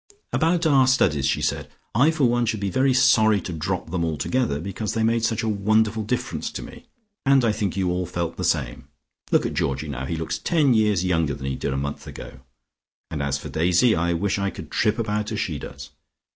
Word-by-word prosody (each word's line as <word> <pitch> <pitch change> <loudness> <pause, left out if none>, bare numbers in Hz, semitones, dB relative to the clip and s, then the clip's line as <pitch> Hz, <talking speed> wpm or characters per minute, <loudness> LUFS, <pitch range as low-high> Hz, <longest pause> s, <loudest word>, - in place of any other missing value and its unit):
"About 170 +1 +2
our 135 -4 +5
studies," 75 - +2
she - - 0
said. - - -2 0.2
"I 130 +8 +4
for 155 -3 0
one 120 -1 +2
should 110 -1 -1
be 100 -1 -2
very 130 +7 +2
sorry 120 -4 +4
to 90 - -6
drop 85 +1 -3
them 90 -2 -1
altogether, 80 - -1
because 100 +6 -4
they 115 - +1
made 115 0 +1
such 110 -1 0
a - - -1
wonderful 110 +1 +1
difference 125 - -3
to - - -5
me, 240 +1 -12 0.4
and 135 -2 +4
I 110 - +3
think 105 -3 -2
you 95 -2 +1
all 90 0 -2
felt 85 -1 -3
the 90 - -5
same. 70 -8 -1 0.4
Look - - +3
at - - -2
Georgie 70 +3 -2
now: 65 -1 -4
he 85 - -2
looks 80 0 -3
ten 150 -6 +2
years 105 -5 +2
younger 80 -6 +1
than 65 0 -8
he 65 -1 -2
did 70 - -3
a 70 - -2
month 70 +1 -4
ago, 65 - -9 0.7
and 75 -3 -3
as 70 0 0
for - - -8
Daisy, 90 +8 +3
I 85 +1 +1
wish 95 +4 -1
I 100 0 0
could - - -10
trip 105 - +1
about 105 -2 -2
as 110 - -2
she 80 -8 -2
does. 70 +2 -9
100 Hz, 225 wpm, -23 LUFS, 80-115 Hz, 0.7 s, our